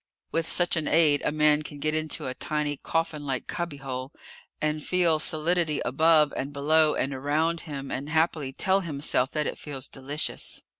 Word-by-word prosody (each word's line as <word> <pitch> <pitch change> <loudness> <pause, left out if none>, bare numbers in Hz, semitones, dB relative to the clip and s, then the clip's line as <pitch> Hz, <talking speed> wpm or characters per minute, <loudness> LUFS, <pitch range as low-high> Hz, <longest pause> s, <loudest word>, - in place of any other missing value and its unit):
With 165 0 -1
such 175 -1 +3
an 155 - -1
aid, 150 -3 +4
a - - +1
man 150 0 +3
can 150 -1 -8
get 155 +2 -1
into 155 -1 -1
a 130 - -3
tiny, 150 0 -2
coffinlike 145 -6 -2
cubbyhole, 135 -6 -5 0.5
and 155 0 -1
feel 175 -4 +2
solidity 160 0 +2
above 155 +3 +4
and 135 - -3
below 150 +2 +3
and 135 - -1
around 155 +5 0
him, 140 -2 -6
and 140 +3 -4
happily 160 -3 +1
tell 190 +7 +2
himself 145 -6 0
that 150 -1 0
it - - -4
feels 140 -2 -4
delicious. 140 +3 -4
150 Hz, 165 wpm, -27 LUFS, 140-160 Hz, 0.5 s, aid